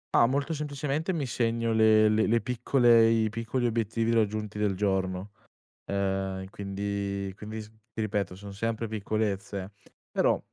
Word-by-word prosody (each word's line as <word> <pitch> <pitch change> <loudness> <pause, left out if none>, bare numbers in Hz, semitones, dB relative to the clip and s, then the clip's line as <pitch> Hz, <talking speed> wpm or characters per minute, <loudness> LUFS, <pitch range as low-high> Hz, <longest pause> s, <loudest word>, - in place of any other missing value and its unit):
Ma, 115 - +6
molto 140 +5 0
semplicemente 150 +2 -2
mi 160 -6 -1
segno 115 -1 0
le 110 -1 +5
le 110 +2 +3
piccole 120 0 +4
i 110 -1 +2
piccoli 115 +3 -2
obiettivi 115 0 0
raggiunti 105 -1 0
del 105 -2 +1
giorno, 95 0 -1 0.6
ehm, 95 -1 -1
quindi 100 -1 -3
quindi 110 +2 -7
s 105 - -13
ti 110 0 -8
ripeto, 100 -3 -1
son 100 0 -9
sempre 115 +2 -2
piccolezze, 100 -2 -2 0.4
però - - +2
110 Hz, 135 wpm, -28 LUFS, 100-115 Hz, 0.6 s, Ma